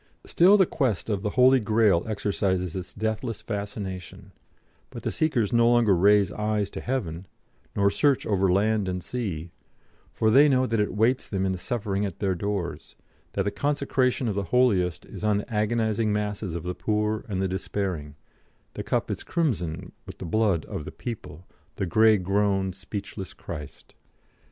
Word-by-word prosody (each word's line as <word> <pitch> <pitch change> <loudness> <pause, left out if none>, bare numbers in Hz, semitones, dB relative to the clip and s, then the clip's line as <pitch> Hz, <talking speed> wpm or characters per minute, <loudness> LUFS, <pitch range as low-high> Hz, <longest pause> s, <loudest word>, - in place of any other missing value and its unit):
Still 190 +5 +5
the 190 - +5
quest 115 - -1
of 100 -2 -1
the 105 - -1
Holy 130 +1 +6
Grail 105 -5 +3
exercises 95 -4 -1
its 90 -1 -5
deathless 110 +1 -2
fascination, 100 -3 -6 0.6
but - - -9
the - - -1
seekers 140 - 0
no 115 0 +5
longer 120 -5 +4
raise 100 +1 +4
eyes 105 -1 -1
to - - -6
heaven, 95 -9 -3 0.5
nor 100 0 +3
search 140 +4 +2
over 95 -3 +2
land 105 +1 +2
and 90 -1 -3
sea, 90 -10 -4 0.6
for 110 -1 +1
they 140 +5 +7
know 130 -1 +3
that 115 -3 0
it 105 - 0
waits 120 +5 +1
them 95 -2 -1
in 95 - +1
the 95 - -3
suffering 100 -2 -2
at 95 -4 -3
their 95 -2 0
doors, 95 -1 -4 0.4
that - - 0
the 100 - -1
consecration 135 +1 0
of 105 - 0
the 100 0 -2
holiest 95 -11 +2
is - - -10
on 105 -1 +2
the 105 +3 -5
agonising 110 0 +1
masses 105 -3 -2
of 85 - -4
the 90 0 -3
poor 105 +2 -1
and 95 -3 -2
the 95 - +1
despairing, 90 -5 -3 0.6
the - - -5
cup - - -1
is - - -4
crimson 95 - -2 0.2
with - - -9
the - - -7
blood 95 -3 +1
of - - -5
the - - -7
"'People, 90 -8 -7 0.3
the 100 - -2
grey 110 +4 +5
grown 95 0 +1
speechless 100 -1 -7
Christ.' 75 -1 -9
105 Hz, 175 wpm, -26 LUFS, 95-115 Hz, 0.6 s, they